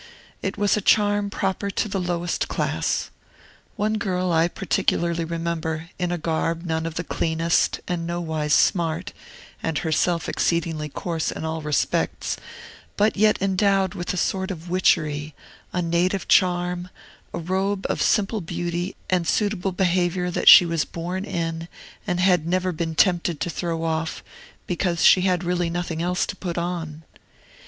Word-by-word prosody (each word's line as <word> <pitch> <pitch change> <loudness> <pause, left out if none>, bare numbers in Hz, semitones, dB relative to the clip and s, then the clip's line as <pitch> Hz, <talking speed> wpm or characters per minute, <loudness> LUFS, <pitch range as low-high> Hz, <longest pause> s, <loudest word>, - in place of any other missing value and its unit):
It 190 - -3
was 205 -1 +3
a 210 - -1
charm 205 0 +3
proper 195 0 -2
to 200 - -1
the 195 -1 -2
lowest 175 -1 -1
class. - - -1 0.6
One 215 +1 0
girl 185 -4 -1
I 165 0 +4
particularly 170 -3 0
remember, 165 -1 -3
in 180 -1 -1
a 175 - 0
garb 165 +1 -1
none 160 -1 -1
of 160 - -6
the 175 - -2
cleanest 165 0 0
and 170 -2 -2
nowise 160 -3 -2
smart, 170 +3 +2 0.5
and 160 -2 -1
herself 165 +1 0
exceedingly 165 -3 -1
coarse 165 +2 -2
in - - -5
all 160 0 -3
respects, 150 -1 0 0.6
but 210 +2 +3
yet 215 +1 +3
endowed 195 -1 +2
with 175 -3 -3
a 185 - -3
sort 190 +1 0
of 175 -2 -7
witchery, 155 -5 +1 0.4
a 180 - -1
native 175 +3 0
charm, 180 -1 +2 0.4
a - - -4
robe 190 +3 -1
of - - -2
simple 210 0 +2
beauty 175 +2 -3
and 180 -3 +1
suitable 200 -2 0
behavior 180 -1 +1
that - - +4
she 180 - +11
was 165 -2 0
born 180 +3 -4
in 165 -3 -3 0.4
and 180 - 0
had 180 -3 +3
never 185 +1 +1
been 165 -1 -3
tempted 175 -3 +2
to 175 - -2
throw 165 -1 -3
off, 160 0 -2 0.4
because 175 -1 0
she 185 - +7
had 180 -1 +1
really 175 -1 0
nothing 170 -1 -3
else 180 +1 0
to - - -5
put 175 -2 -5
on. 165 -3 -4
175 Hz, 155 wpm, -23 LUFS, 165-185 Hz, 0.6 s, she